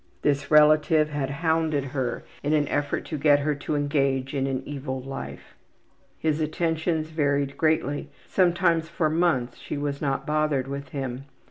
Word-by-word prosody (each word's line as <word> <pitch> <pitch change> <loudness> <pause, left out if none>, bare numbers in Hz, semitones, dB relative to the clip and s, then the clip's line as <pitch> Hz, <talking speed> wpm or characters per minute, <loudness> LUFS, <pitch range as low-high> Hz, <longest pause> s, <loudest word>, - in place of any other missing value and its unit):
This 140 -1 +1
relative 155 0 +5
had 145 -2 -2
hounded 160 -1 0
her 130 -3 -3 0.2
in 145 +2 0
an 150 -2 +2
effort 145 0 -1
to 155 - -4
get 145 0 +5
her 150 +1 +1
to 145 +1 -3
engage 140 -2 0
in 135 -1 0
an 130 -1 -2
evil 135 -2 -4
life. 70 - -8 0.6
His 155 0 0
attentions 160 0 -1
varied 145 -3 0
greatly; 155 -2 0 0.2
sometimes 170 -3 +2
for 155 -2 0
months 155 -8 +1
she - - -5
was 145 -1 -3
not 135 -1 -1
bothered 150 -3 +1
with 140 +1 -5
him. 135 -1 -4
145 Hz, 155 wpm, -25 LUFS, 135-155 Hz, 0.6 s, relative